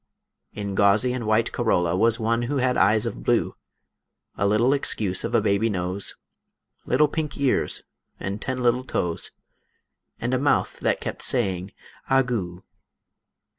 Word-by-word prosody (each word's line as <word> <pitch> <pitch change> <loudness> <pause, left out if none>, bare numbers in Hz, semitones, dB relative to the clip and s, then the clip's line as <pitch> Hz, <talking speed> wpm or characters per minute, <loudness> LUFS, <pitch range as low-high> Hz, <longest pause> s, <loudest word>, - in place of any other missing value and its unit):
In 100 -2 -4
gauzy 105 +5 +3
and 120 -3 -4
white 110 +1 +2
corolla, 90 -8 +1
Was 115 +4 +2
one 115 +1 +1
who 145 - 0
had 125 -1 +1
eyes 105 +2 +3
of - - -4
blue, - - +1 0.8
A 100 - +1
little 115 +6 +3
excuse 105 -9 0
of - - -2
a - - +4
baby 100 +3 +1
nose, 90 0 -3 0.7
Little 150 - +4
pink 150 0 -4
ears, 140 -3 +1 0.4
and 100 +3 -4
ten 130 -1 -2
little 125 +1 +2
toes, 90 -9 -1 0.9
And 120 +2 -2
a 130 - +2
mouth 145 +2 +1
that - - 0
kept - - -5
saying 95 -6 0 0.4
ah 135 0 +4
goo. 95 -8 -4
110 Hz, 150 wpm, -24 LUFS, 100-125 Hz, 0.9 s, a